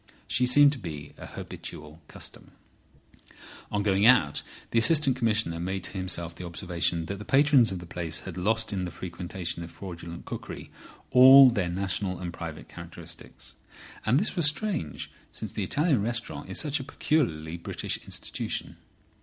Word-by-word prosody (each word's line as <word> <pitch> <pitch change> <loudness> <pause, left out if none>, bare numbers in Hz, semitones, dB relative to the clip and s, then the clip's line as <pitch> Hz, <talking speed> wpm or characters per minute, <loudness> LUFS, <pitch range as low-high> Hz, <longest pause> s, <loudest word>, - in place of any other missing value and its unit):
She 125 0 +2
seemed 145 +3 +7
to 140 - -6
be 75 -7 -7
a - - -8
habitual 75 +2 -9
customer. - - -9 1.2
On 105 0 0
going 100 +1 +3
out 100 - +5 0.3
the 115 - +4
Assistant 140 +1 +4
Commissioner 110 -8 0
made 95 +2 -3
to - - -4
himself 90 -3 -2
the 90 - -9
observation 85 -1 -1
that 100 +3 -5
the - - -6
patrons 135 -2 +4
of 95 - -3
the 90 - -8
place 85 -1 -4
had 95 - -8
lost 110 +5 0
in 95 -2 -2
the - - -4
frequentation 85 0 -5
of 85 - -8
fraudulent 85 -1 -9
cookery - - -7 0.4
all 130 +1 +10
their 100 -7 -1
national 95 +1 -2
and 85 -1 -5
private 80 -3 -7
characteristics. - - -11 0.5
And 120 +6 +3
this 205 - 0
was 170 -4 +4
strange, 150 - -2 0.2
since - - -7
the - - -4
Italian 150 - +1
restaurant 115 +1 -3
is - - -2
such 145 -1 0
a - - -5
peculiarly 85 - -1
British 85 - -3
institution. - - -4
95 Hz, 160 wpm, -27 LUFS, 85-125 Hz, 1.2 s, all